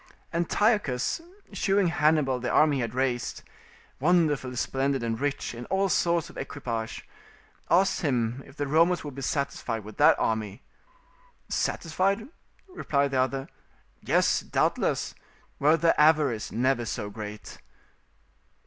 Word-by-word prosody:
Antiochus, 175 - +1 0.3
shewing 195 -2 +2
Hannibal 150 -5 +2
the 125 0 -3
army 150 0 +4
he - - -1
had 115 0 -4
raised, 125 -2 -1 0.6
wonderfully 150 -5 +2
splendid 135 +1 -1
and 115 -1 -2
rich 145 -2 -2
in 120 +1 -7
all 195 0 +1
sorts 170 -2 +1
of - - -10
equipage, 115 -4 -5 0.6
asked 190 +2 +3
him 125 -4 0
if 140 - -16
the 145 - -1
Romans 165 +5 +3
would 145 -2 -6
be 135 - -7
satisfied 125 -5 -2
with 105 0 -11
that - - +6
army? 110 -3 -2 0.9
"Satisfied," 195 - -1 0.4
replied 140 - -1
the 130 -1 +2
other, 135 +1 -2 0.5
"yes, - - +2
doubtless, - - 0 0.5
were 155 +3 +4
their 165 +1 +3
avarice 150 -8 +3
never 125 0 +1
so 105 -2 -4
great." 105 0 -8
140 Hz, 130 wpm, -27 LUFS, 120-165 Hz, 0.9 s, that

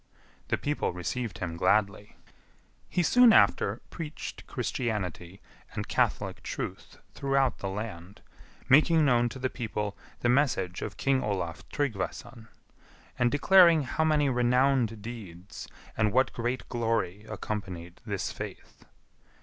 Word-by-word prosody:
The - - 0
people 145 0 -1
received 95 +3 -4
him 85 -3 -4
gladly. 105 +1 +1 0.7
He 175 - +1
soon 245 +6 +6
after - - +3
preached 155 -3 -7
Christianity 95 -6 -3 0.3
and - - -4
catholic - - 0
truth - - -6 0.2
throughout 135 -2 +1
the 95 - -3
land, 95 -2 -7 0.4
making 155 +4 +5
known 120 -3 +3
to 130 - -8
the 130 0 -1
people 105 -5 -4 0.3
the - - +1
message 120 -9 +1
of 100 - -5
King 135 -1 +2
Olaf 90 -7 -3
Tryggvason; 115 -2 -4 0.7
and 120 0 +3
declaring 170 +1 +6
how 135 +5 -1
many 150 -2 +3
renowned 125 -3 +2
deeds 100 -6 -9 0.3
and 110 -1 +2
what 130 +4 +2
great 120 +2 -3
glory 115 -5 -1
accompanied 95 -6 -6
this 100 -5 -3
faith. - - -9
115 Hz, 125 wpm, -28 LUFS, 100-135 Hz, 0.7 s, soon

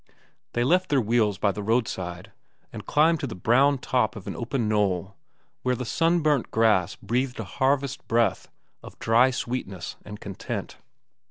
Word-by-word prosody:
They 120 - +1
left 180 +7 +2
their 145 - +3
wheels 110 -3 +1
by 100 - +2
the 105 - -6
roadside 95 -5 -2 0.4
and - - -8
climbed 160 +2 +3
to 140 - -3
the 120 - -6
brown 130 +9 +3
top 125 -3 0
of 100 - -9
an - - -5
open 120 -1 -2
knoll 100 -2 0 0.5
where 125 0 +1
the 125 - -5
sunburnt 155 -2 +1
grass 105 -6 +2
breathed 125 +5 -2
a - - -2
harvest 135 0 -1
breath 115 -4 +1 0.3
of - - -12
dry 115 +3 +4
sweetness 120 -8 -4
and 105 0 -9
content. 100 -2 -6
120 Hz, 160 wpm, -25 LUFS, 105-135 Hz, 0.5 s, dry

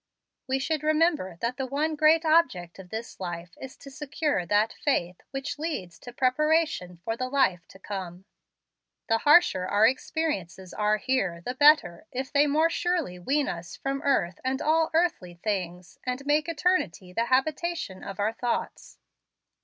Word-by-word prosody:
We 265 0 +1
should 305 +2 -1
remember 305 - +1
that 240 +2 -2
the 265 - -3
one 300 +4 -1
great 315 +2 +4
object 255 - +2
of 185 -2 -11
this 225 +3 -7
life 175 -1 -5
is 265 -1 -9
to 275 - -12
secure 285 - -2
that 210 +3 +2
faith 180 - -1
which 275 +2 -5
leads 185 - -4
to 245 - -10
preparation 270 - +1
for 225 - -1
the 255 +1 -3
life 220 -11 +1
to - - -15
come. 190 -2 -7 0.8
The 225 0 +3
harsher 290 - +5
our 205 +3 +4
experiences 225 - -2
are 210 0 +1
here, 195 -7 -1
the 250 - -2
better, 285 - +4
if 260 +2 -5
they 290 +1 +4
more 315 +3 +2
surely 340 - -1
wean 280 +10 0
us 170 -1 -5
from 275 0 -3
earth 200 - +1
and 260 +1 -1
all 320 +2 +2
earthly 310 - 0
things, 180 -2 -4
and 255 +2 -4
make 300 +3 +2
eternity 295 - 0
the 230 +5 0
habitation 285 - -1
of 195 +1 -7
our 210 +2 +1
thoughts. 240 +1 -4
255 Hz, 160 wpm, -27 LUFS, 185-300 Hz, 0.8 s, harsher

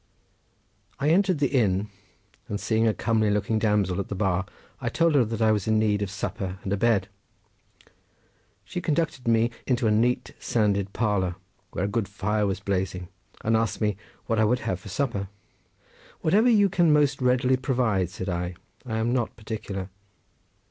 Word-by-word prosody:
I 145 - +1
entered 185 0 +3
the 140 -2 +1
inn 105 -6 +1 0.6
and 100 - -3
seeing 110 +1 +1
a 110 - +3
comely 110 -2 +1
looking 105 +2 +1
damsel 105 -4 +1
at 100 - -3
the 100 - -4
bar 95 -2 0 0.3
I - - -1
told 165 -1 +2
her 140 -4 +5
that 115 0 -2
I 110 - +5
was 105 -2 0
in 110 0 +3
need 105 -1 +2
of 100 - -1
supper 95 -2 -4
and 95 - -2
a - - +3
bed. 105 -2 +2 1.6
She 180 - -4
conducted 155 -6 -1
me 115 +1 +3 0.2
into 125 -2 +1
a 110 - +3
neat 120 +3 +1
sanded 100 -3 0
parlour 100 -5 0 0.3
where 90 - -2
a - - 0
good 105 0 -1
fire 105 +1 -1
was 95 -2 -2
blazing 95 -3 -2 0.3
and 110 +1 +2
asked 115 0 0
me 105 -2 +1 0.3
what 115 -1 0
I - - +4
would 125 +4 +2
have 90 - -2
for 100 - -11
supper. 100 -3 -2 0.9
"Whatever 210 +9 +4
you 205 -4 +5
can 175 -4 +3
most 145 -2 +3
readily 125 +1 +3
provide," 120 - 0
said 95 +1 -6
I; 90 0 -2 0.3
"I 110 -2 -2
am 115 +2 0
not 120 -3 -1
particular." 105 -4 -5
110 Hz, 175 wpm, -26 LUFS, 100-125 Hz, 1.6 s, her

